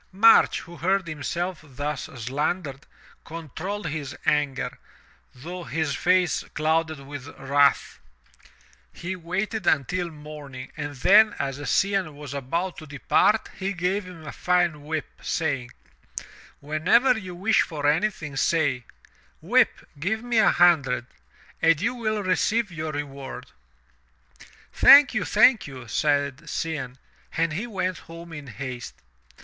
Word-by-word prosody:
*' - - -39 0.2
March, - - +3
who 170 0 -12
heard 190 +2 +1
himself 170 +4 -3
thus 145 0 -5
slandered, 140 +4 -3 0.4
controlled 165 +5 -6
his 150 -3 -4
anger, 140 -4 0 0.6
though 175 +8 -7
his 160 -3 -2
face 180 0 +2
clouded 160 -1 0
with 140 -1 -8
wrath 140 +1 +2 0.9
He 185 - -5
waited 185 +4 -3
until 170 +4 +1
morning 150 -4 -10
and 145 -1 -5
then, 210 - +5
as 135 0 -3
Cianne 190 +3 0
was 145 -1 -8
about 165 +7 -3
to 155 - -11
depart, 175 +9 +2
he 195 +1 -2
gave 180 +3 -1
him 175 -4 -11
a - - -6
fine 175 -4 +1
whip, 155 +1 -3 0.2
saying: 135 -7 -2 0.9
"Whenever 195 - +3
you 185 -5 -7
wish 195 +5 +3
for 150 -4 -4
anything 155 -2 0
say: 140 -4 +1 0.5
'Whip, - - +2
give 220 +9 -1
me 240 -2 +1
a 220 - +6
hundred,' 140 -9 +3 0.6
and 165 -2 +4
you 230 +7 0
will 215 -4 -2
receive 205 +3 +1
your 155 -1 -4
reward." 140 -2 -7 1.2
"Thank 285 -1 +8
you, 205 -7 -1
thank 220 0 +4
you," 130 -3 -10
said 145 +4 0
Cianne, 145 -6 -4 0.4
and 165 -1 +1
he 205 +9 -3
went 185 -5 -2
home 165 0 -11
in 145 -2 -8
haste. 125 -1 -7
160 Hz, 130 wpm, -25 LUFS, 145-185 Hz, 1.2 s, Thank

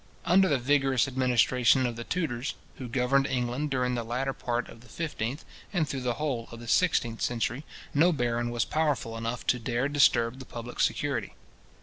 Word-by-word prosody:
Under 185 +3 +5
the 140 - +3
vigorous 135 -1 +2
administration 125 0 +3
of 120 -1 -2
the 120 - -6
Tudors, 140 -5 -2 0.2
who 130 - -6
governed 135 +3 +2
England 125 +3 -1
during 125 -2 0
the 120 -1 -2
latter 125 +4 -2
part 120 -1 -2
of 115 - -13
the 120 - -17
fifteenth, 145 -2 -4 0.3
and 175 -6 +1
through 135 -2 -3
the 125 -2 -1
whole 135 -7 -3
of 115 - -9
the 120 - -10
sixteenth 120 -7 +2
century, 120 +3 -1 0.3
no 165 +5 +5
baron 120 -5 0
was 120 0 0
powerful 150 -7 0
enough 115 +1 -4
to 125 - +2
dare 120 +3 -1
to 145 - -7
disturb 120 -3 +3
the 130 - -9
public 120 0 -8
security. 130 -8 0
125 Hz, 190 wpm, -28 LUFS, 120-140 Hz, 0.3 s, Under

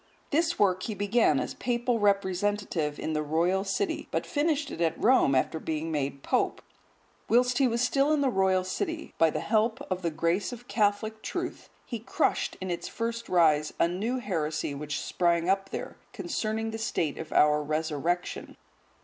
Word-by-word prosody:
This 330 +3 +1
work 185 -2 +3
he 215 +2 -3
began 205 - +3
as - - -3
papal 240 -1 0
representative 195 -5 0
in 160 - -3
the 155 - 0
royal 170 +6 +1
city, 325 - -2
but - - -2
finished 295 -1 0
it 165 - -6
at 165 -1 +1
Rome 240 - +4
after 130 +5 +1
being 160 +1 -3
made 140 -2 -2
pope. - - 0 0.7
Whilst 245 +2 +3
he 270 - +5
was 235 0 0
still 275 +3 +2
in 305 -2 +2
the 270 -2 +2
royal 190 -2 +2
city, 320 - -4
by 165 - +6
the - - -3
help 220 +1 +1
of 185 0 -1
the 170 - 0
grace 170 +7 0
of 245 0 -9
Catholic 215 +1 0
truth, 355 -1 -5 0.2
he 235 - -5
crushed 230 - 0
in 185 -1 -4
its 175 - -3
first 230 0 -4
rise 155 -4 +3
a - - +4
new 210 +9 -2
heresy 160 - -2
which 145 +1 -4
sprang 170 -1 +1
up 195 +1 +1
there, - - -6 0.2
concerning 215 +4 -2
the 225 - -5
state 165 -9 -1
of 160 - -7
our 150 0 +4
resurrection. 155 +3 -2
195 Hz, 175 wpm, -28 LUFS, 160-235 Hz, 0.7 s, by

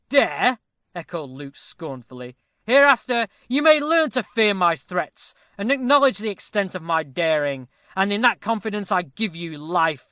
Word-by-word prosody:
"Dare!" 255 -2 +2 0.4
echoed 165 -4 -8
Luke, 140 +1 -13
scornfully; 125 -5 -12 0.3
"hereafter, 250 -2 +4 0.2
you 270 +4 0
may 310 0 +6
learn 315 +1 +2
to 255 -2 -2
fear 215 -2 +1
my 175 -3 +2
threats, 180 +2 -7 0.2
and 210 +6 -2
acknowledge 275 -3 +3
the 215 +1 -4
extent 200 -1 -4
of 185 - -7
my 165 -1 -1
daring; 145 -3 -2 0.3
and 195 +1 +1
in 205 +2 -1
that 240 -3 +3
confidence 210 -2 -4
I 180 -2 +1
give 175 +5 -5
you 165 -3 -9
life. 160 -1 -1
195 Hz, 160 wpm, -21 LUFS, 160-245 Hz, 0.4 s, may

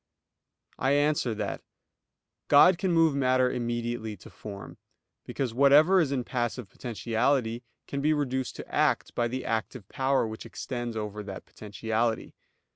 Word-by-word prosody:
I 135 +1 +2
answer 145 -5 +1
that, 105 -1 -4 0.9
God 170 +5 +6
can 190 -1 0
move 165 -2 +4
matter 130 -2 +2
immediately 120 -2 -3
to - - -14
form; 100 -2 -9 0.5
because 130 -4 -3
whatever 145 +8 +6
is 145 -4 0
in 130 -3 0
passive 120 -4 -3
potentiality 120 +1 -1 0.2
can 140 - -4
be 150 +2 +3
reduced 130 -4 -1
to - - -8
act - - +1
by 120 - 0
the 130 +2 -4
active 115 -2 -3
power 135 -2 +1
which 110 0 -7
extends 120 -3 -5
over 105 -1 -4
that 95 -2 -8
potentiality. 110 +2 -2
125 Hz, 140 wpm, -28 LUFS, 110-140 Hz, 0.9 s, God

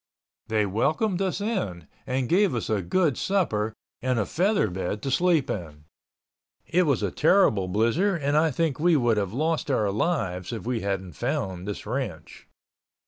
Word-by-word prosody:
They 110 -2 +1
welcomed 155 - 0
us 190 0 -1
in 185 - -2 0.2
and 130 -1 -1
gave 185 - +3
us 115 - -3
a 105 -3 +1
good 150 - +1
supper 120 - 0 0.3
and 130 -1 0
a 105 - +1
feather 190 - +1
bed 95 +3 -3
to 135 - -2
sleep 170 -1 +3
in. 75 -6 -6 0.8
It 180 0 +2
was 135 -7 +1
a 100 - 0
terrible 150 - +3
blizzard 115 - +1
and 145 0 0
I 160 +1 +4
think 155 -1 -1
we 170 +1 +4
would 120 -6 +2
have 100 -3 -1
lost 155 +5 -1
our 110 -7 +1
lives 100 - -1
if 115 -2 -5
we 120 -2 -1
hadn't 95 -3 -3
found 95 +5 -3
this 105 - -5
ranch. 110 -7 -5
125 Hz, 170 wpm, -26 LUFS, 100-165 Hz, 0.8 s, I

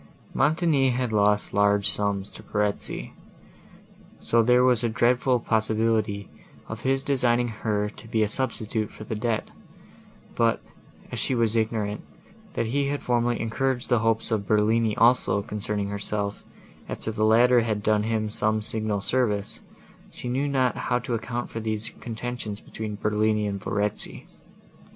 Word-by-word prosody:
Montoni 150 -1 +3
had 125 -1 -1
lost 105 0 +3
large 100 0 +3
sums 100 -1 -1
to - - -11
Verezzi, 105 -1 -1 1.1
so 115 - +1
that 115 - -1
there 125 0 +5
was 125 -2 +3
a 120 - +2
dreadful 125 +2 +2
possibility 110 -2 0 0.4
of - - -7
his 135 0 +1
designing 125 -4 +2
her 105 -2 -1
to 115 - -11
be 110 -1 +1
a - - +1
substitute 110 -2 -2
for - - -10
the 110 - -5
debt; 110 0 -2 0.8
but, 115 -1 +2 0.5
as - - -3
she 130 - 0
was 115 -2 +2
ignorant, 110 -2 -1 0.5
that - - -1
he 140 +5 0
had 145 +1 -2
formerly 120 -1 +1
encouraged 125 +3 -1
the 120 - +4
hopes 115 +1 0
of 105 -3 -1
Bertolini 110 +1 +2
also, 115 -4 +3
concerning 105 -1 -3
herself, 100 0 -3 0.5
after 110 - -3
the 110 0 -1
latter 120 +3 +5
had 110 -3 -1
done 105 0 +3
him 110 0 -1
some 110 0 0
signal 110 -2 -2
service, 105 -4 -1 0.5
she - - -8
knew 130 +4 0
not 130 -3 +1
how 120 - 0
to 125 0 -4
account 120 +1 -3
for 115 - -4
these 110 -1 -2
contentions 115 -2 -5
between 110 -1 -6
Bertolini 105 0 +1
and 100 -1 -3
Verezzi. 105 0 -2
110 Hz, 155 wpm, -25 LUFS, 105-120 Hz, 1.1 s, there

